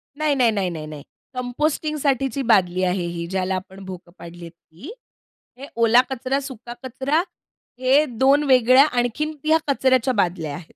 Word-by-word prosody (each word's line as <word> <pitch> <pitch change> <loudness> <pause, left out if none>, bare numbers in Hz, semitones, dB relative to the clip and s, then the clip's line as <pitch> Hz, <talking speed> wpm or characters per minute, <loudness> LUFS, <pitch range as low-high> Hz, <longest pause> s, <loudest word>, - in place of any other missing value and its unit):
नाही, 300 -1 0
नाही, 240 -4 +3
नाही, 195 -4 -1
नाही, 155 -3 -6
नाही. 150 -2 -9 0.3
कंपोस्टिंगसाठीची 275 0 -1
बादली 185 -2 +2
आहे 180 -1 0
ही, 170 0 -5
ज्याला 190 0 -2
आपण 190 +1 -8
भोकं 180 -2 -10
पाडली 170 +1 -11
आहेत 165 - -11
ती. 170 - -14 0.7
हे 275 +2 -9
ओला 230 +1 +5
कचरा, 265 +1 -2
सुका 245 -4 -9
कचरा 265 +5 -1 0.6
हे 270 +4 +3
2 270 +4 +2
वेगळ्या 255 0 +5
आणखीन, 295 +4 -2
या 315 +1 +4
कचऱ्याच्या 260 -2 +2
बादल्या 175 -7 -1
आहेत. 160 +2 -8
245 Hz, 155 wpm, -22 LUFS, 185-275 Hz, 0.7 s, ओला